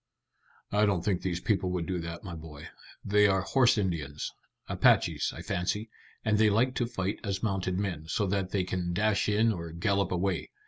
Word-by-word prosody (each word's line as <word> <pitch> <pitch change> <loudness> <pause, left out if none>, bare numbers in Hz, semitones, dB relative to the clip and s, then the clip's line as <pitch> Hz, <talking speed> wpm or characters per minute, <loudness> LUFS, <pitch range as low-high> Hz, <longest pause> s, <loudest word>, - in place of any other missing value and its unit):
"I 105 +1 +3
don't 95 -4 0
think 95 -4 +1
these 90 -2 -2
people 95 -4 +1
would 90 -2 -2
do 90 0 -2
that, 85 0 -6
my 90 -4 -6
boy. 80 -3 -9 0.4
They 105 +1 +5
are 95 -1 +2
horse 125 +3 +3
Indians 80 -7 -2 0.3
Apaches, - - +3
I - - -9
fancy, 105 +5 -2 0.3
and 105 -1 +2
they 110 -1 +5
like 120 +5 +2
to 120 - +1
fight 95 -3 -3
as 100 -1 -3
mounted 95 -3 -1
men, 90 -6 -3
so 105 +5 0
that 95 -1 -1
they 95 -1 0
can 90 -1 -2
dash 105 +2 +1
in 110 +2 +3
or 85 -3 -6
gallop 100 +3 0
away. 90 0 -1
95 Hz, 190 wpm, -29 LUFS, 90-105 Hz, 0.4 s, They